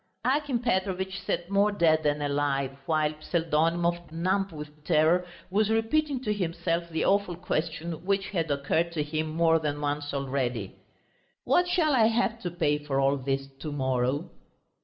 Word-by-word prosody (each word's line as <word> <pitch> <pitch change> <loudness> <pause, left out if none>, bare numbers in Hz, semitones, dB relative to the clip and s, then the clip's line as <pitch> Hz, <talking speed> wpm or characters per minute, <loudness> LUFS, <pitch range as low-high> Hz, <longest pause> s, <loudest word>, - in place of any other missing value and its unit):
Akim 275 0 +1
Petrovitch 190 -4 -1
sat 175 +2 -3
more 200 +1 +3
dead 165 -5 +3
than 150 -1 0
alive, 140 -2 0
while 155 -1 +2
Pseldonimov, 170 +1 0
numb 190 +4 0
with 150 -1 -10
terror, 165 +3 +3 0.2
was 210 +2 +2
repeating 260 +6 +1
to 210 - 0
himself 170 -2 -2
the 160 - -1
awful 200 -3 +2
question 165 -1 -3
which 195 +1 0
had 165 -5 -1
occurred 145 +4 0
to 155 -3 0
him 155 +1 -2
more 165 +1 +3
than 145 -2 -2
once 145 0 -2
already. 130 -7 -2 0.7
"What 355 0 +3
shall 335 -4 +2
I 225 -4 +5
have 230 0 +1
to 175 - -2
pay 155 -4 0
for 135 -2 -1
all 135 +1 +3
this 135 +1 -2
to 155 - -5
morrow?" 130 +3 -1
165 Hz, 160 wpm, -28 LUFS, 150-195 Hz, 0.7 s, I